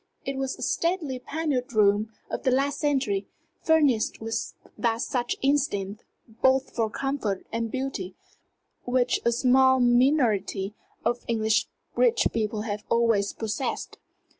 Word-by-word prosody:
It 275 - -2
was 270 0 -3
a - - -7
stately 335 -7 -1
panelled 280 -3 -2
room 210 0 +3 0.2
of - - -4
the - - +1
last 275 +3 +1
century, 260 -10 0 0.3
furnished 290 -9 +2
with 225 +1 -3 0.2
that 230 -1 0
sure 245 -2 -1 0.2
instinct 220 -8 0 0.4
both 265 0 +3
for 225 -2 +1
comfort 245 -6 -2
and 230 0 -1
beauty 240 -8 -4 0.7
which 250 0 +1
a 235 - +3
small 260 +2 +4
minority 240 -6 +2 0.3
of 240 +1 0
English 220 -1 +1 0.3
rich 475 -2 +3
people 215 -1 -1
have 210 -1 -4
always 230 -4 +2
possessed. 225 +4 -4
240 Hz, 130 wpm, -26 LUFS, 215-270 Hz, 0.7 s, small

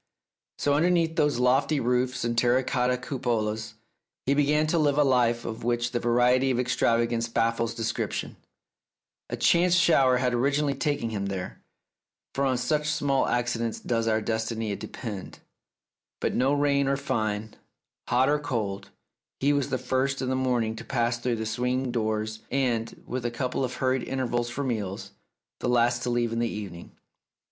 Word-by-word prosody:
So 145 - +1
underneath 165 +1 +2
those 150 -5 +2
lofty 135 +4 +2
roofs 125 +1 0
and 120 0 -1
terra 120 +2 +3
cotta 125 0 +1
cupolas, 110 -4 -2 0.5
he 140 - +3
began 150 +2 +3
to 160 +2 +1
live 145 -2 +2
a 150 - +5
life 120 -3 +2
of 110 -1 -5
which 120 0 0
the 120 - -1
variety 125 +2 +3
and 125 -2 +1
extravagance 115 -2 +1
baffles 115 0 0
description. 115 -1 -3 0.9
A - - -3
chance 175 +1 +4
shower 140 -7 +4
had 125 0 0
originally 140 +3 +1
taken 140 -5 -1
him 100 -2 -2
there 95 -2 -5 0.7
(for 140 - 0
on 130 -2 +1
such 150 +4 0
small 140 -3 +1
accidents 115 -2 -1
does 115 -1 -1
our 110 0 +2
destiny 110 -1 -2
depend), 105 -1 -7 0.8
but - - -1
now 135 +3 +2
rain 140 -1 +2
or 135 0 +1
fine, 110 -5 -2 0.5
hot 125 +2 +3
or 150 +1 +2
cold, 110 -9 -3 0.5
he 140 +2 +3
was 140 -2 0
the 130 - 0
first 130 +2 -1
in 130 - -2
the 130 - +1
morn 130 -2 +1
ing 110 0 -3
to 115 - -7
pass 120 -1 0
through 120 0 -1
the 110 0 -3
swing 125 +3 -1
doors 110 -2 -2
and, 120 -4 -1
with 125 -1 -4
a 120 - 0
couple 125 +2 -2
of 125 -1 -3
hurried 130 -1 +1
intervals 120 -2 -2
for 135 +4 -3
meals, 105 -7 -3 0.5
the - - -1
last 120 0 +2
to 125 - -2
leave 120 -1 0
in 115 - -1
the 120 0 0
evening. 95 -5 -7
125 Hz, 170 wpm, -27 LUFS, 115-135 Hz, 0.9 s, a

